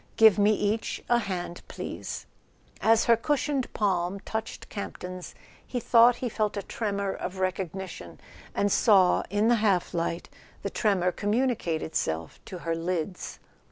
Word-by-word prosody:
Give 220 -2 +7
me 205 +1 +5
each 210 +2 -1
a 240 - +5
hand, 180 -5 -4
please." - - -6 0.6
As 225 +1 +4
her 235 - +6
cushioned 280 +2 -1
palm 190 -2 0
touched 220 +1 -5
Camp 200 - -6
ton's 180 0 -7 0.3
he 250 - -3
thought 235 +1 +6
he - - +1
felt 215 -2 -1
a 200 - -2
tremor 200 -2 -2
of 185 +1 -5
recognition, 185 0 -4 0.4
and 200 0 +2
saw, 190 -5 +5
in 205 +3 +2
the 240 0 +5
half 195 -5 +2
light, 170 0 -2 0.4
the - - -2
tremor 190 -5 +2
communicate 205 -6 0
itself 80 - -2
to 185 - -7
her 165 - +1
lids. 175 +2 -3
200 Hz, 150 wpm, -27 LUFS, 180-225 Hz, 0.6 s, Give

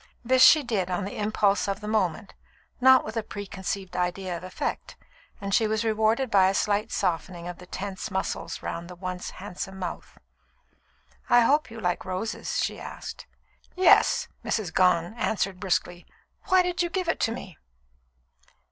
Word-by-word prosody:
This 255 +2 +4
she 310 -2 +8
did 205 -7 -1
on 185 +1 -1
the 200 - -6
impulse 205 -2 +1
of 195 0 -2
the 210 - -7
moment, 205 -4 -1 0.5
not 260 0 +6
with 220 - -6
a - - +1
preconceived 195 -2 -5
idea 180 0 -2
of 170 - -7
effect, 185 - -4 0.4
and 200 0 -4
she 220 - +4
was 220 +1 -1
rewarded 220 +3 +1
by 190 -2 +5
a 195 - -1
slight 210 +2 0
softening 175 0 -2
of 175 -1 -7
the 180 - -12
tense 195 +2 -5
muscles 190 -1 -3
round 170 +1 -5
the 180 - -9
once 180 0 -5
handsome 190 0 -7
mouth. 180 -2 -6 1.1
"I 240 - +7
hope 290 +6 +3
you 225 0 -9
like 180 -4 -1
roses?" 185 +4 -3
she - - -3
asked. - - -8 0.5
"Yes," 370 +1 +5 0.2
Mrs. 195 -8 -2
Gone 180 0 +3
answered 195 -3 -1
brusquely. 180 -2 -1 0.4
"Why 370 -1 +4
do 360 0 -1
you 345 - -1
give 370 0 -2
it 330 - 0
to 225 - +1
me?" 195 -7 -8
195 Hz, 165 wpm, -26 LUFS, 185-225 Hz, 1.1 s, she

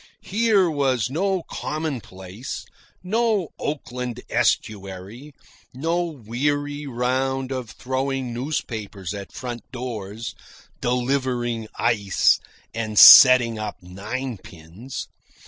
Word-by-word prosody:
Here 210 -2 +3
was 130 -7 0
no 190 +3 0
commonplace, 120 - -6 0.4
no 215 -2 +1
Oakland 125 -4 -4
Estuary, 100 +6 -2 0.4
no 165 +6 0
weary 145 +2 -2
round 130 +1 -1
of 130 -4 -4
throwing 130 0 -3
newspapers 110 - -4
at 100 -1 -8
front 120 -2 -6
doors, 115 -4 -6 0.5
delivering 120 -2 -1
ice, 105 -5 +2 0.3
and 110 -2 -4
setting 120 -3 +10
up 105 -1 -4
ninepins. 100 0 -7
125 Hz, 85 wpm, -23 LUFS, 110-140 Hz, 0.5 s, setting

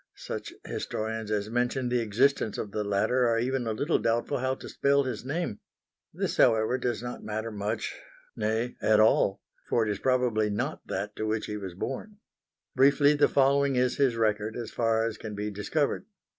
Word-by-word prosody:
Such - - -6
historians 110 0 -4
as 105 0 -1
mention 125 +1 0
the 125 0 +2
existence 115 +1 +1
of 105 - -4
the 105 - -2
latter 105 +5 +2
are 115 -1 +2
even 125 +1 -1
a - - 0
little 140 +9 +1
doubtful 120 +5 0
how 130 +1 0
to - - -10
spell 140 0 +2
his 125 -5 -4
name. 145 -4 -3 0.5
This, - - -2
however, 110 +3 +4
does 120 -2 -2
not 120 0 -6
matter 110 +1 -3
much 105 +1 -3 0.4
nay, 110 +3 -1
at 110 -1 +4
all, 100 -2 +4 0.3
for 115 - +2
it 105 - 0
is 100 - -3
probably 125 -5 +2
not 100 - -2
that 105 +1 -3
to 110 - -2
which 110 0 -1
he 105 - -4
was 95 -4 -7
born. 170 - -5 0.6
Briefly 140 +2 +5
the 145 0 +4
following 140 0 +3
is 125 0 +1
his 135 -5 +3
record 110 -1 0
as 115 -2 -5
far 115 -1 +1
as 115 -1 -4
can 110 -2 -6
be 105 +1 -3
discovered. 140 - -1
115 Hz, 185 wpm, -28 LUFS, 105-130 Hz, 0.6 s, Briefly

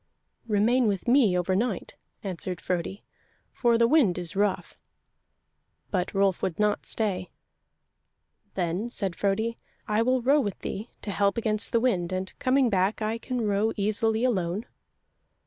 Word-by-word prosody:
"Remain 225 +3 +3
with 200 +2 -1
me 240 -8 +4
overnight," 190 +4 -1 0.3
answered 185 -2 -4
Frodi, 180 +2 -3 0.5
"for 235 -2 +2
the 230 0 +4
wind 240 - +4
is 175 0 -3
rough." 205 -1 0 1.2
But 185 -2 0
Rolf 195 -2 +2
would 175 - -2
not 210 0 0
stay. 190 -5 -2 1.3
"Then," 180 +5 -1
said 195 -7 -2
Frodi, 220 +5 -1 0.3
"I 215 +1 +2
will 255 +1 +2
row 280 +4 +4
with 205 -6 -3
thee, 215 +4 -5
to 205 - -3
help 200 +1 +1
against 215 -2 -1
the 230 - +3
wind, 190 -8 0
and 185 0 -3
coming 260 0 +3
back 195 -1 +1
I 220 +2 -1
can 250 +1 -3
row 210 +2 +1
easily 220 +2 +1
alone." 200 -3 0
210 Hz, 145 wpm, -27 LUFS, 185-230 Hz, 1.3 s, me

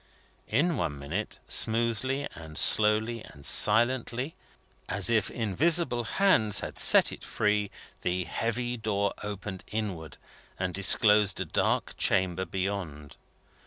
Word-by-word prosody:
In 150 +8 0
one 75 -2 -4
minute, 80 +10 -6
smoothly 115 +5 0
and 80 -2 -10
slowly 110 +2 +4
and 70 -1 -13
silently, 120 +5 +4 0.6
as 95 +2 0
if 110 -2 +1
invisible 120 - 0
hands 110 - +1
had - - -7
set - - +6
it - - -11
free, 105 -1 -2 0.3
the 90 +1 -2
heavy 120 +5 -4
door 100 -2 -2
opened 100 -2 -7
inward, 100 -7 -6 0.4
and 90 -1 -4
disclosed 105 +1 +4
a - - -3
dark - - -2
chamber 95 0 0
beyond. 90 -6 -6
105 Hz, 120 wpm, -27 LUFS, 95-120 Hz, 0.6 s, set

